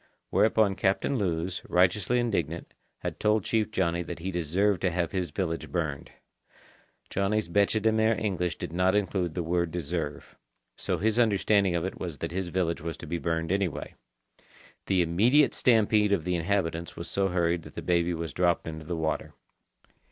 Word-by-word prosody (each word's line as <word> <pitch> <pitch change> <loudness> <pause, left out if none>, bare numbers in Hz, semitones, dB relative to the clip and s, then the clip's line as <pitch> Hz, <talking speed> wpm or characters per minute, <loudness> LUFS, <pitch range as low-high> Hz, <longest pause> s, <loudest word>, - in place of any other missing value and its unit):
Whereupon 110 -2 +3
Captain 100 +9 +1
Lewes, 90 -1 -1
righteously 95 +7 +3
indignant, 85 -9 -2 0.3
had - - -4
told 105 -1 +2
Chief 110 +1 0
Johnny 85 -5 0
that 85 0 -6
he 90 +3 -4
deserved 90 +3 +1
to 95 - +2
have 85 -1 -1
his 90 -3 -2
village 80 +3 -3
burned. 80 -6 -2 1.0
Johnny's 100 +1 0
bêche 100 +4 +2
de 110 +1 +2
mer 110 +1 +3
English 90 -5 -1
did 80 - -6
not 90 +2 +2
include 95 -5 0
the 90 - -1
word 85 +1 0
"deserve." 80 -3 -4 0.4
So - - -2
his 110 +3 +1
understanding 100 -4 +3
of 85 +1 0
it 95 - -5
was 85 -5 -5
that - - -4
his 95 +1 -2
village 85 -2 -1
was 80 0 -5
to - - -9
be 85 +2 -3
burned 80 0 -1
anyway. 95 -5 -1 0.9
The 95 -2 +3
immediate 115 - +4
stampede 110 -3 +3
of 90 -6 +1
the 90 +1 0
inhabitants 85 -2 -1
was 85 - -6
so 95 0 0
hurried 85 -2 +1
that - - -13
the - - -5
baby 85 -1 +1
was 80 -2 -5
dropped 90 -2 +1
into 80 -1 -6
the 85 0 -3
water. 80 -1 -2
90 Hz, 175 wpm, -28 LUFS, 85-100 Hz, 1.0 s, immediate